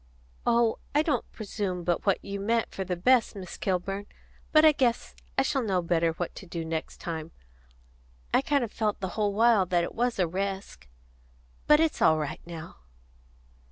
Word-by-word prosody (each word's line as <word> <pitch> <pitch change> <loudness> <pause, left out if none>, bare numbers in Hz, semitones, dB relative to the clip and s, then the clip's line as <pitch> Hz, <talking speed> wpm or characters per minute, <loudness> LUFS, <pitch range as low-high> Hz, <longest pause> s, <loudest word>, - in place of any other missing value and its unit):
"Oh, 235 -1 +3 0.2
I 300 - +5
don't 315 - -1
presume 200 -4 -4
but 175 +3 -1
what 195 - +2
you 200 0 -4
meant 225 +3 0
for 190 - -3
the 185 -1 -2
best, 235 +6 +3
Miss 185 -3 -7
Kilburn. 195 +2 -2 0.4
But 310 0 +6
I 310 - +9
guess 250 -5 0 0.2
I 270 - +4
shall 270 0 0
know 195 -6 +1
what 170 0 0
to 195 - -10
do 170 -1 -4
next 160 0 -4
time. 160 -2 -5 1.0
I - - +5
kind 280 -1 +1
of 225 - -4
felt 215 -2 -1
the 190 - -3
whole 205 +2 0
while 225 -4 +4
that 175 -1 +2
it - - -4
was 240 +1 0
a 185 - +3
resk. 190 - -4 0.8
But 300 0 +7
it's 320 -1 +1
all 160 - +5
right 150 -2 -4
now." 170 -1 -8
195 Hz, 180 wpm, -28 LUFS, 175-235 Hz, 1.0 s, I